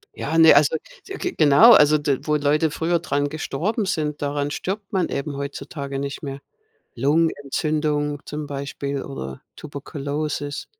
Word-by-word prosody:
Ja, 160 +3 -2
ne, 160 -2 +8
also, 145 +2 +4 0.3
so 390 - -9
g 365 - -3
genau. 155 +10 +7
Also, 150 -5 +6
d 145 -3 0
wo 150 - +1
Leute 150 +1 +2
früher 170 +2 0
dran 145 -4 -1
gestorben 170 - -2
sind, 150 -6 -2
daran 145 0 -1
stirbt 195 +5 -4
man 185 -3 +1
eben 140 +1 -3
heutzutage 140 0 -5
nicht 140 +2 -5
mehr. 140 -1 -6 0.5
Lungenentzündung 150 +1 0
zum 150 0 -5
Beispiel 140 0 -4
oder 70 - -7
Tuberkulosis. 145 0 -4
145 Hz, 145 wpm, -22 LUFS, 140-160 Hz, 0.5 s, ne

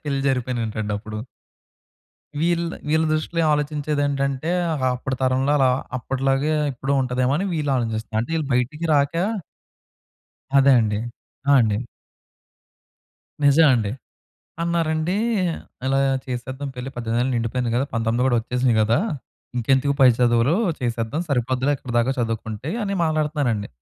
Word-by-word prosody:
పెళ్లి 140 -2 -1
జరిగిపోయినంటండి 115 -5 -2
అప్పుడు. 110 0 -7 1.2
వీళ్ 170 0 +1 0.2
వీళ్ళ 160 +1 +3
దృష్టిలో 165 +2 0
ఆలోచించేదేంటంటే, 145 -1 -1 0.4
అప్పటి 130 +1 -3
తరంలో 130 +2 +2
అలా 130 -2 +4 0.3
అప్పటిలాగే 135 +4 0 0.2
ఇప్పుడు 135 +2 -3
ఉంటాదేమోనని 130 +7 0
వీళ్ళు 150 -3 -1
ఆలోచిస్తున్నారు. 110 -2 -2
అంటే 165 - -6
ఈళ్ళు 155 -3 -2
బయటికి 145 +7 -1
రాక. 140 +1 +2 1.4
అదే 135 0 +6
అండి. 105 -1 0 0.5
ఆ! - - +5
అండి. 105 -2 +1 1.7
నిజం 145 +3 +6
అండి, 105 -4 0 0.7
అన్నారండి, 165 0 0 0.7
"ఇలా 135 +1 +2 0.3
చేసేద్దాం 130 +3 -5
పెళ్లి, 125 +2 -5
18 120 0 -1
ఏళ్లు 130 +1 0
నిండిపోయింది 120 +1 -1
కదా, 130 +3 +2
19 115 +1 0
కూడా 125 - +3
వచ్చేసినయి 125 0 +1
కదా! 110 +2 +2 0.6
ఇంకెందుకు 135 +4 +2
పై 130 - +8
చదువులు 120 +4 +3 0.3
చేసేద్దాం 120 +5 -2
సరిపోద్దిలే 130 +1 +1
ఇక్కడి 125 - -8
దాకా 125 +3 +2
చదువుకుంటే," 115 +3 -3
అని 200 -1 -2
మాట్లాడుతున్నారండి. 150 -9 0
130 Hz, 120 wpm, -22 LUFS, 120-145 Hz, 1.7 s, పై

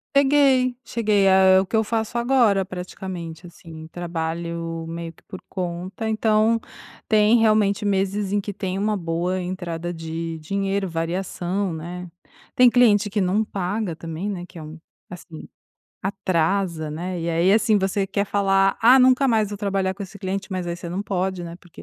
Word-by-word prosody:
Cheguei, 270 -3 +4
cheguei, 210 -4 +1
é 190 0 +6
é - - +6
o 190 - 0
que 195 - -3
eu 220 - +3
faço 225 +1 -2
agora, 235 -6 +3
praticamente, 180 -2 -7
assim, 160 -2 -11
trabalho 165 -1 -4
meio 165 0 -6
que - - -25
por 185 - -10
conta, 185 +4 -4
então 220 +1 +2 0.5
tem 215 +2 +4
realmente 215 -2 +3
meses 195 0 0
em 205 - +2
que 205 0 -5
tem 190 -1 -3
uma 210 +2 0
boa 175 +1 -2
entrada 175 -2 -4
de 165 0 -5
dinheiro, 195 +4 -2
variação, 175 +2 -2
né, 175 +3 -6 0.5
tem 250 -1 +7
cliente 225 -4 +4
que 205 +1 -1
não 195 +3 +2
paga 195 -2 -3
também, 165 +4 -5
né, 180 -3 -5
que 175 - -12
é - - -8
um 155 +1 -9 0.3
assim, 175 -2 -10 0.5
atrasa, 180 -4 -1
né, 175 +3 -4
e 165 - -3
aí, 170 +3 +3
assim, 215 0 +4
você 195 0 0
quer 200 +1 -1
falar: 195 -1 +2
"Ah, 250 +4 +7
nunca 255 +2 +5
mais 220 -4 +2
vou 205 0 -6
trabalhar 195 -2 -1
com 200 - -7
esse 195 +2 -12
cliente", 195 0 -4
mas 185 -2 -3
aí 170 0 -3
você 175 0 -7
não 180 +4 -3
pode, 190 -2 -2
né, 170 0 -7
porque 175 -3 -14
190 Hz, 175 wpm, -23 LUFS, 170-210 Hz, 0.5 s, tem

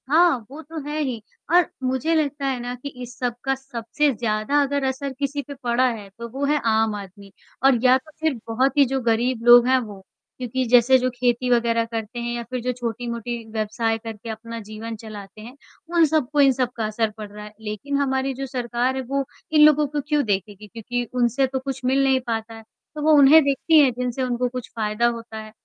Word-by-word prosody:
हाँ, 330 0 +5
वो 300 +3 -8
तो 320 +1 -8
है 300 +1 -3
ही 255 -7 -2 0.3
और 355 -2 +5 0.2
मुझे 260 +5 0
लगता 290 -2 -1
है 265 -2 -1
ना 245 +1 -4
कि 250 +3 -7
इस 245 -1 -10
सब 245 -2 -1
का 270 - +1
सबसे 270 +2 -1
ज़्यादा 220 +5 0
अगर 280 0 0
असर 265 +1 -3
किसी 285 0 -1
पे 285 0 -9
पड़ा 245 +1 +2
है, 215 -4 -7
तो 235 +4 -9
वो 270 +4 -3
है 295 +1 +2
आम 220 -1 +2
आदमी 200 0 -10 0.3
और 270 -1 +6
या 255 0 +6
तो 265 +4 -15
फ़िर 315 -6 0
बहुत 255 +6 +1
ही 285 - +7
जो 265 +1 -1
गरीब 235 +1 0
लोग 240 0 +8
हैं 260 0 +4
वो। 210 -5 -8 0.4
क्योंकि 255 +1 -2
जैसे 245 +2 +5
जो 255 0 0
खेती 245 0 0
वग़ैरह 235 -1 +2
करते 230 +1 -5
हैं 240 0 -3
या 240 - -4
फ़िर 250 +1 -5
जो 250 +2 -1
छोटी-मोटी 235 0 -4
व्यवसाय 225 +1 -1
करके 225 0 -8
अपना 230 +1 -6
जीवन 220 +1 -7
चलाते 215 -1 -10
हैं, 240 +4 -11 0.4
उन 335 -1 +6
सबको 295 -2 +1
इन 275 -1 +6
सबका 245 -3 -2
असर 215 +1 0
पड़ 215 -1 -6
रहा 210 0 -9
है। 210 - -12
लेक़िन 220 +7 -3
हमारी 265 -1 0
जो 270 +1 -5
सरकार 250 -1 -1
है 265 - -2
वो 275 +2 -2 0.3
इन 305 -1 +5
लोगों 300 -1 +5
को 290 +1 -3
क्यों 295 -1 +2
देखेगी? 205 0 -3
क्योंकि 240 +3 -4
उनसे 250 +2 +2
तो 265 0 -3
कुछ 265 0 -5
मिल 270 +2 +3
नहीं 265 -1 +3
पाता 225 -1 -3
है। 225 0 -11 0.3
तो, 300 - -5
वो 310 +1 +3
उन्हें 285 +3 +8
देखती 280 +3 +3
है 275 -3 +5
जिनसे 250 +1 -3
उनको 250 0 0
कुछ 250 -1 -7
फ़ायदा 215 +1 +1
होता 230 -1 -5
है, 215 0 -8
245 Hz, 220 wpm, -23 LUFS, 225-270 Hz, 0.4 s, लोग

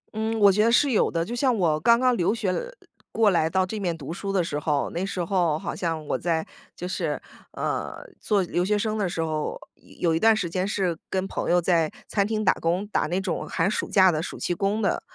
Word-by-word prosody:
嗯， 220 +1 -1
我 200 -1 +7
觉 210 +3 +2
得 230 - +3
是 275 +3 +4
有 215 - +3
的。 165 0 -1
就 240 +5 -5
像 255 -1 +2
我 160 -5 +2
刚 235 +8 +5
刚 255 -1 +3
留 205 +2 +1
学 205 -5 -1
来 - - -1 0.5
过 220 -3 +3
来 160 -2 +2
到 190 +1 +1
这 210 +3 -5
面 175 -4 -1
读 150 +2 -6
书 195 +2 -4
的 190 -3 +2
时 145 -2 -3
候， 150 -2 -1
那 175 - -3
时 190 -2 -2
候 175 -5 +1
好 - - -5
像 165 -3 -2
我 - - -1
在， 165 -2 -1 0.3
就 180 - -5
是， - - -2 0.3
呃， - - -3 0.2
做 205 -3 +1
留 175 0 -1
学 210 +3 +1
生 215 +1 -1
的 200 -4 0
时 165 - -3
候， 155 -1 -3
一 - - -20
有 170 -2 +2
一 160 - +1
段 225 0 +5
时 185 -5 -1
间 185 +3 -2
是 185 -5 0
跟 190 0 -1
朋 - - -3
友 175 +1 +4
在 170 -2 +2 0.2
餐 200 -1 +1
厅 215 -1 -1
打 - - +5
工， 175 +5 -1
打 205 - 0
那 180 +4 -1
种 185 -3 -3
寒 165 +4 +1
暑 - - -2
假 190 -2 +5
的 155 -1 -1
暑 - - -6
期 175 - -1
工 200 +4 -1
的 - - +1
185 Hz, 270 characters per minute, -25 LUFS, 170-210 Hz, 0.5 s, 我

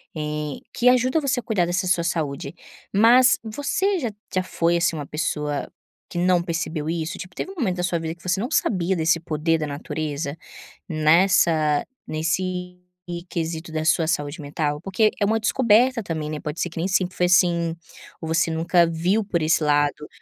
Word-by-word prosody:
eh 150 -2 -3
que 240 - +1
ajuda 255 +4 +3
você 275 -2 0
a - - -7
cuidar 195 -6 +1
dessa 180 +2 -1
sua 180 -2 +2
saúde. 150 -3 -3 0.4
Mas 240 +6 +6
você 290 - -1
já 240 -7 -2 0.2
já 185 - +2
foi, 170 -2 +1
assim, 170 -1 +1
uma 150 -2 -5
pessoa 150 -2 -2 0.4
que - - -7
não 180 0 +3
percebeu 165 -2 -3
isso, 165 -1 -3
tipo, 185 -1 -9
teve 380 - -4
um - - -12
momento 230 - -1
da 180 - -2
sua 175 -2 0
vida 160 0 -4
que 170 - -22
você 180 +1 0
não 235 +5 -2
sabia 190 - +1
desse 165 0 +2
poder 165 0 0
da 155 - -2
natureza 145 0 -4 0.5
nessa 155 -2 +3 0.2
nesse 180 +3 -2 0.5
quesito 165 0 -4
da 155 0 -2
sua 160 0 +3
saúde 145 -1 -2
mental, 145 0 -2
porque 195 +4 +2
é 205 - +2
uma 220 +2 +1
descoberta 235 +2 +3
também, 160 -4 -4
né, 155 -1 -4
pode 150 +3 -5
ser 175 - -1
que 170 - -13
nem 165 +3 0
sempre 185 -1 0
foi 180 - +3
assim 170 -2 +3 0.5
ou 160 - -5
você 165 +1 +2
nunca 170 +2 +3
viu 175 +6 +1
por 175 -4 -1
esse 155 +1 +2
lado? 145 0 +1
170 Hz, 185 wpm, -23 LUFS, 155-190 Hz, 0.5 s, Mas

